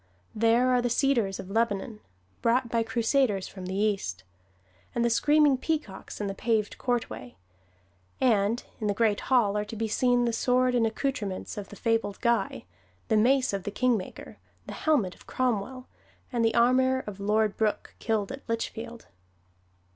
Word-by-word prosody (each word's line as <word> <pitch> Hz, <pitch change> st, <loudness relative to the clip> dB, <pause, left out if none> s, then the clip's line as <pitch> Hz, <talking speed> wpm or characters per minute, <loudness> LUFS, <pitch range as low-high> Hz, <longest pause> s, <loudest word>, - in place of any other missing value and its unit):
There 230 Hz, +3 st, +3 dB
are 250 Hz, -1 st, +3 dB
the 245 Hz, -, 0 dB
cedars 235 Hz, -6 st, +1 dB
of 190 Hz, -, -8 dB
Lebanon, 220 Hz, 0 st, -1 dB, 0.4 s
brought 235 Hz, +1 st, +2 dB
by 230 Hz, 0 st, +1 dB
Crusaders 225 Hz, -2 st, +1 dB
from 185 Hz, -2 st, -8 dB
the 190 Hz, -, -4 dB
East, 195 Hz, -, -1 dB, 0.7 s
and 235 Hz, 0 st, +1 dB
the 235 Hz, -, +2 dB
screaming 295 Hz, +2 st, +4 dB
peacocks 295 Hz, -11 st, -4 dB
in 210 Hz, -, -2 dB
the 195 Hz, -, -2 dB
paved 215 Hz, 0 st, -1 dB
courtway: 240 Hz, -, -3 dB, 0.8 s
and 220 Hz, -1 st, +2 dB, 0.2 s
in 215 Hz, -, -2 dB
the 205 Hz, -, 0 dB
Great 215 Hz, -1 st, +2 dB
Hall 235 Hz, -6 st, +3 dB
are 210 Hz, 0 st, 0 dB
to 210 Hz, -, -8 dB
be 225 Hz, +1 st, -2 dB
seen 245 Hz, +2 st, +2 dB
the 235 Hz, -, 0 dB
sword 250 Hz, +2 st, +2 dB
and 235 Hz, -2 st, +3 dB
accouterments 220 Hz, -5 st, -3 dB
of 205 Hz, -2 st, -7 dB
the -, -, -10 dB
fabled 225 Hz, -3 st, -1 dB
Guy, 230 Hz, -, 0 dB, 0.4 s
the 220 Hz, -, +3 dB
mace 255 Hz, +2 st, +3 dB
of 195 Hz, -, -1 dB
the 195 Hz, -, -4 dB
"Kingmaker," 225 Hz, -2 st, -2 dB, 0.3 s
the -, -, -7 dB
helmet 255 Hz, -, +1 dB
of -, -, -20 dB
Cromwell, 255 Hz, +1 st, -2 dB, 0.5 s
and 235 Hz, -1 st, +1 dB
the 225 Hz, 0 st, +2 dB
armor 260 Hz, +2 st, +3 dB
of 205 Hz, -2 st, -7 dB
Lord 210 Hz, +1 st, +1 dB
Brooke, 215 Hz, -1 st, -1 dB
killed 220 Hz, -2 st, -1 dB
at 270 Hz, +1 st, -7 dB
Litchfield. 230 Hz, +1 st, -4 dB
230 Hz, 165 wpm, -27 LUFS, 205-250 Hz, 0.8 s, screaming